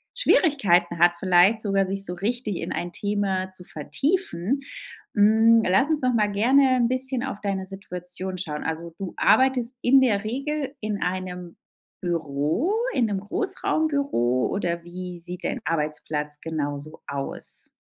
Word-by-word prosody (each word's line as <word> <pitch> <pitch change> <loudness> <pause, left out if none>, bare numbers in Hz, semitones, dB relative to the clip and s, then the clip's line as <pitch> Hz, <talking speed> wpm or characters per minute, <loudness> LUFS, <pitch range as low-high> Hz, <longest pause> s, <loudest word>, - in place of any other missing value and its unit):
Schwierigkeiten 195 - +3
hat 175 +1 +6
vielleicht 190 +4 +4
sogar, 195 -2 +1
sich 195 +1 -4
so 180 - -4
richtig 215 +1 -2
in - - -4
ein 175 0 -3
Thema 195 -3 -1
zu 185 -1 -11
vertiefen. 270 - -1 0.5
Hm, 220 +2 +6
lass 195 +11 +3
uns 305 -3 +1
doch 255 -1 +2
mal 210 -2 +3
gerne 255 +5 +4
'n 240 -1 +3
bisschen 255 0 -1
auf 235 -6 -4
deine 195 -2 -2
Situation 185 -1 -6
schauen. 150 -4 -4
Also, 160 +1 -4
du 190 -3 -5
arbeitest 260 -2 +3
in 265 +2 +6
der 215 -5 +2
Regel 275 +4 -3
in 210 -2 -3
einem 180 -1 -4 0.5
Büro 165 - 0 0.2
in 245 -4 +2
'nem 200 -3 -1
Großraumbüro 280 - 0
oder 170 -3 -2
wie 180 0 -7
sieht 180 +1 -8
dein - - -2
Arbeitsplatz 150 -1 -2
genau 145 -3 -3
so 155 +2 -12
aus? 140 -1 -6
195 Hz, 150 wpm, -25 LUFS, 175-245 Hz, 0.5 s, hat